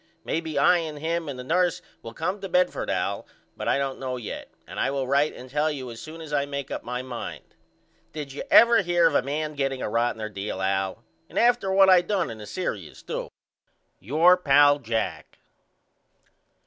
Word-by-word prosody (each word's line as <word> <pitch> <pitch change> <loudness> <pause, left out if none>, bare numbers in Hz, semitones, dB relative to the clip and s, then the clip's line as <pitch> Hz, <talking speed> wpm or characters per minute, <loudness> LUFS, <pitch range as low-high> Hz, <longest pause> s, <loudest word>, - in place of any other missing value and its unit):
Maybe 160 -1 -3
I 145 +6 +5
and 155 -3 -5
him 165 +1 -2
and 135 - -5
the 125 - -6
nurse 180 +4 +1 0.2
will 115 0 -9
come 185 +5 -2
to 195 - -5
Bedford 180 0 +1
Al - - -2 0.3
but - - -5
I - - +3
don't 135 -1 -2
know 130 -1 -3
yet 120 - -7 0.2
and - - -8
I - - +1
will 135 -1 -1
write 140 +3 +2
and 125 - -10
tell 150 +4 0
you 130 -5 -5
as 115 - -9
soon 160 +1 -9
as 155 -2 -8
I 140 -1 +1
make 140 -1 -5
up - - -4
my 125 +1 -4
mind. 125 -2 -6 0.7
Did 145 -3 -6
you 145 - -5
ever 235 0 +7
hear 175 -2 +2
of 165 - +4
a - - +4
man 150 +3 -3
getting 135 -2 -1
a - - -2
rottener 115 -1 0
deal 100 -1 -4
Al? 95 0 -1 0.3
And - - -9
after 240 -5 +3
what 195 0 +6
I 185 -2 +7
done 185 - -1
in 110 - -9
the 105 - -9
serious 105 - -5
too. - - -5 0.7
Your 160 - +4
pal, 145 -3 +5
JACK. 115 -3 -3
145 Hz, 200 wpm, -25 LUFS, 125-170 Hz, 0.7 s, ever